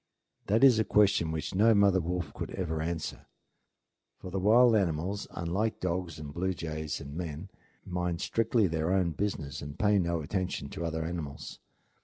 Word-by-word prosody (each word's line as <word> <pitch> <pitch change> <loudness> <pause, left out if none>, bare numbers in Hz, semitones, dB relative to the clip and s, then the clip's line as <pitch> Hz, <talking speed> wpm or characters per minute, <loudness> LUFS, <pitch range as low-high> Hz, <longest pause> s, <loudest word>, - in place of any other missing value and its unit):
That 110 +5 +3
is 125 -5 +7
a - - +4
question 100 -7 +3
which 80 -1 -4
no 110 +4 +5
mother 100 -2 +4
wolf 90 +2 -3
could - - -5
ever 80 -4 -2
answer; 80 -1 -4 0.9
for 90 - -9
the 95 - -1
wild 115 +4 +6
animals, 95 +1 -1
unlike 95 +6 -2
dogs 90 -3 -2
and 75 -1 -8
blue 95 +3 -1
jays 80 -3 -4
and 70 +1 -8
men, 85 +1 -5 0.4
mind 90 -1 -2
strictly 115 +2 +1
their 80 -1 0
own 95 -3 +2
business 80 -5 -3
and 70 0 -8
pay 105 -1 +3
no 85 -2 0
attention 90 -2 -3
to 85 - -5
other 80 -1 -2
animals. 80 -4 -6
90 Hz, 170 wpm, -30 LUFS, 80-100 Hz, 0.9 s, is